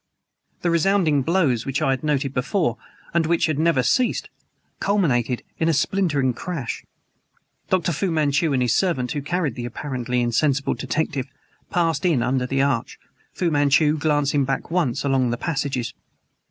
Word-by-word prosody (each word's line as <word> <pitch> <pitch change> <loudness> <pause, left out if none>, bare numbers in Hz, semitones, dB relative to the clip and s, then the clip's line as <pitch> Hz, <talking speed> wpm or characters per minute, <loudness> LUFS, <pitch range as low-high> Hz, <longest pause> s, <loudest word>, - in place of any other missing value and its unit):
The 175 - +2
resounding 170 -4 +3
blows 140 -7 +1
which 135 0 -2
I 135 - +1
had 130 -1 -2
noted 140 -3 0
before, 130 - 0 0.4
and 165 -2 +2
which 170 0 +2
had 155 -2 -1
never 160 -5 +3
ceased, 250 - +1 0.5
culminated 130 - +1 0.2
in 160 - +2
a - - +3
splintering 145 -6 +1
crash. 140 -3 -5 0.9
Dr. 180 -2 +1
Fu 185 +5 -1
Manchu 155 -1 +1
and 130 -2 +2
his 120 -2 +2
servant, 130 -9 0
who 145 - -2
carried 160 -2 -1
the 120 +1 -5
apparently 125 -1 -2
insensible 135 +4 +1
detective, 135 0 -2 0.4
passed 170 -1 0
in 160 -10 +2
under 125 0 0
the 135 +1 +1
arch, 135 -4 -1 0.4
Fu 175 -3 0
Manchu 145 +1 +3
glancing 145 -2 +1
back 135 +4 -3
once 150 -8 0
along 135 -3 +2
the 120 - -1
passages. 135 -5 -2
145 Hz, 155 wpm, -23 LUFS, 130-165 Hz, 0.9 s, resounding